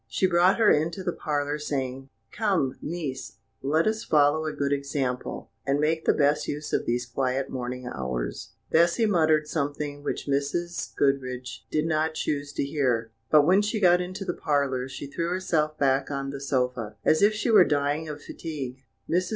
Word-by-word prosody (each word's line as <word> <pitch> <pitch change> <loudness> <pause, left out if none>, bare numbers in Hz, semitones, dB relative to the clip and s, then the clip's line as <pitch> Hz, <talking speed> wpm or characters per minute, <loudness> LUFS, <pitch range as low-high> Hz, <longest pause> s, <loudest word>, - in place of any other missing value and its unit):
She 115 - 0
brought 180 +1 +4
her 225 -3 +5
into 165 +5 +1
the 175 - -1
parlour, 145 -1 -2
saying: 135 -2 -3 0.2
"Come, 190 - 0
niece, 150 -5 -5 0.3
let 155 +4 +2
us 220 0 0
follow 150 +1 +3
a - - -1
good 140 -1 -1
example, 140 -3 -3
and 140 +1 +1
make 160 +2 +1
the - - +5
best 150 +1 +2
use 150 +1 -4
of - - 0
these 120 +1 0
quiet 130 +2 -1
morning 125 0 -4
hours." 65 - -4 0.2
Bessy 170 +7 +4
muttered 155 -6 +3
something 145 -1 -3
which - - -3
Mrs. 145 +5 -2
Goodriche 130 -2 -1
did 155 0 0
not 160 0 0
choose 145 -2 -2
to - - -1
hear, 125 -6 0 0.2
but 150 -2 +6
when 185 +5 +5
she 210 +1 -1
got 180 -2 +5
into 185 +2 -5
the 175 - -1
parlour, 140 -5 0
she 135 - -7
threw 165 +4 -3
herself 160 -4 0
back 135 -1 +2
on 135 -1 -3
the 140 -1 -7
sofa 125 -5 -1
as 155 - +4
if 210 +1 +5
she 225 +2 0
were 205 -4 +8
dying 145 +1 0
of 150 -1 -7
fatigue. 135 -5 -6 0.2
Mrs. 180 +2 +1
145 Hz, 180 wpm, -26 LUFS, 135-165 Hz, 0.3 s, were